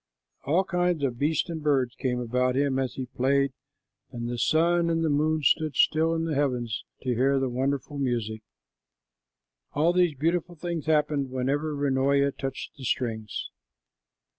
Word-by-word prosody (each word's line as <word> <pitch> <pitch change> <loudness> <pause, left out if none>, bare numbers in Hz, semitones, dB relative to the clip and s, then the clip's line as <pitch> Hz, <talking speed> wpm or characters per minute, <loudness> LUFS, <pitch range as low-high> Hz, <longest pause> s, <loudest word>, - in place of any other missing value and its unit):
All 165 +7 +3
kinds 180 -4 0
of 125 -3 -1
beasts 155 +3 +1
and 165 -2 -5
birds 135 -5 +1
came 125 -1 -2
about 125 +2 0
him 140 -1 +1
as 130 -2 -2
he 130 - -4
played, 135 +2 +1 0.6
and 120 -1 -5
the 120 0 -3
sun 170 +3 +3
and 165 0 +1
the 155 - +1
moon 155 +1 +1
stood 155 +1 +2
still 160 +3 +3
in 165 0 -1
the 160 - -1
heavens 125 -6 -1 0.2
to 130 -2 0
hear 135 +3 +2
the 135 -1 0
wonderful 135 +3 -2
music. 115 -5 -1 1.3
All 160 +4 +3
these 180 -4 +3
beautiful 170 +4 0
things 170 -1 -4
happened 150 -3 +1
whenever 140 +4 -1
Runoia 140 0 +2
touched 135 +1 -6
the 135 - -10
strings. 110 -4 -2
140 Hz, 160 wpm, -27 LUFS, 130-155 Hz, 1.3 s, All